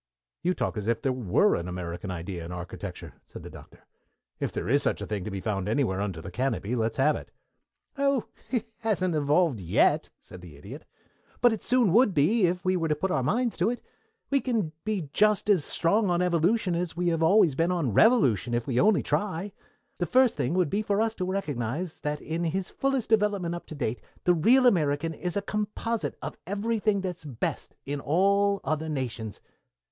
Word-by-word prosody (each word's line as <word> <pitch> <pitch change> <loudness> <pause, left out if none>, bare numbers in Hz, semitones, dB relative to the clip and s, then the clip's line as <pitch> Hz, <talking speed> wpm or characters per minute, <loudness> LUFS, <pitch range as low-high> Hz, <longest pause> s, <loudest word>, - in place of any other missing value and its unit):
"You 180 +1 +1
talk - - -2
as 105 0 -4
if 115 0 0
there 135 - +1
were 120 -8 +2
an 85 - -2
American 90 +1 -5
idea 85 0 -5
in 85 - -7
architecture," 90 0 -8
said - - -10
the - - -9
Doctor. - - -15 0.5
"If - - -2
there - - -4
is 140 +5 +3
such - - 0
a - - -4
thing 105 -3 -3
to - - -3
be 100 -1 -4
found 95 0 -2
anywhere 110 -6 0
under 95 -6 -4
the 95 - -7
canopy, 120 0 -1
let's 115 -1 -1
have 145 +3 +3
it." - - -8 0.7
"Oh, 275 -3 +2 0.3
it 245 -4 -1
hasn't 195 -6 0
been 155 - +1
evolved, 145 - +2
yet," 85 -2 +2
said 90 - -13
the 85 -4 -12
Idiot. 70 - -10 0.5
"But 240 -1 +5
it 220 - -4
soon 245 -8 +3
would 225 -3 +4
be 180 +8 +4
if 180 +1 -3
we 185 0 +2
were 165 -2 0
to 155 - +1
put 190 +5 -2
our 135 - +1
minds 230 - 0
on - - +4
it. 245 - -10 0.5
We 275 -1 +3
can 220 -11 -1
be 205 -8 -2
just 210 0 +3
as 185 -7 +3
strong 200 +4 +1
on 175 -1 +2
evolution 180 +3 +2
as 170 -1 -3
we 175 -1 +1
always 165 +2 +4
have 130 - -10
been 165 +2 +2
on 160 - 0
revolution 125 - +4
if 120 -1 -1
we 125 -2 0
only 210 0 +4
try. 200 -1 -1 0.5
The 175 - 0
first 255 -1 +4
thing 140 +3 -1
would 180 -5 +1
be 205 - +1
for 205 -1 0
us 225 0 +1
to 185 - -3
recognize 155 - -3
that 150 0 -3
in 165 +2 -3
his 185 +3 -2
fullest 270 -4 -1
development 205 -5 +2
up 175 - -7
to 155 - -8
date 120 -4 -3 0.2
the 180 - +4
real 245 +11 +4
American 160 -6 +2
is 180 +3 -3
a 200 - -1
composite 210 +2 -3
of - - -5
everything 210 0 0
that 180 -2 -3
is - - -19
best 130 -6 -4
in 145 +1 -3
all 200 +6 +2
other 155 0 -2
nations. 120 - -4
170 Hz, 210 wpm, -27 LUFS, 125-205 Hz, 0.7 s, But